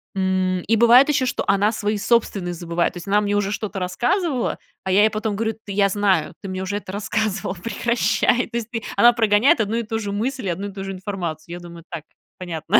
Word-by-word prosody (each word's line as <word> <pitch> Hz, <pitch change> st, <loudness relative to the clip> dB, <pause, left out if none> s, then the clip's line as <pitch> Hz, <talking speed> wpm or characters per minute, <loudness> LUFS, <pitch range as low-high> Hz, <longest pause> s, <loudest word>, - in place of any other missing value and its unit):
М, 185 Hz, -1 st, 0 dB
и 225 Hz, +6 st, +1 dB
бывает 235 Hz, +4 st, +7 dB
еще, 270 Hz, -3 st, +2 dB
что -, -, -1 dB
она 200 Hz, +2 st, +3 dB
свои 210 Hz, -1 st, -1 dB
собственные 200 Hz, -6 st, +1 dB
забывает. 170 Hz, 0 st, -1 dB
То -, -, -9 dB
есть 175 Hz, -, -9 dB
она 205 Hz, +1 st, +3 dB
мне 205 Hz, 0 st, 0 dB
уже 205 Hz, -1 st, 0 dB
что-то 210 Hz, -1 st, -4 dB
рассказывала, 250 Hz, -, 0 dB, 0.3 s
а 190 Hz, -, -2 dB
я 195 Hz, +2 st, +5 dB
ей 215 Hz, -, +4 dB
потом 215 Hz, -1 st, -2 dB
говорю: 225 Hz, +2 st, -1 dB
"Т 220 Hz, -1 st, -11 dB
я 200 Hz, 0 st, +3 dB
знаю, 190 Hz, -5 st, +1 dB
ты 195 Hz, -, -6 dB
мне 185 Hz, 0 st, -4 dB
уже 200 Hz, +2 st, -2 dB
это 200 Hz, -, -8 dB
рассказывала. 205 Hz, -1 st, -2 dB
Прекращай". 235 Hz, +5 st, +1 dB
То 235 Hz, -, -4 dB
есть 235 Hz, -1 st, -4 dB
ты 225 Hz, -2 st, -4 dB
она 240 Hz, 0 st, +7 dB
прогоняет 225 Hz, +1 st, +4 dB
одну 215 Hz, +1 st, -1 dB
и 235 Hz, -, -1 dB
ту 225 Hz, 0 st, -3 dB
же 205 Hz, -2 st, -4 dB
мысль 235 Hz, +3 st, -2 dB
и -, -, 0 dB
одну 185 Hz, +4 st, -3 dB
и -, -, -12 dB
ту 195 Hz, 0 st, -6 dB
же 195 Hz, 0 st, -5 dB
информацию. 175 Hz, -4 st, -5 dB
Я 175 Hz, -, -6 dB
думаю: 170 Hz, -1 st, -11 dB
"Так, 165 Hz, -3 st, -5 dB, 0.4 s
понятно". 175 Hz, +2 st, +1 dB
205 Hz, 235 wpm, -22 LUFS, 185-225 Hz, 0.4 s, бывает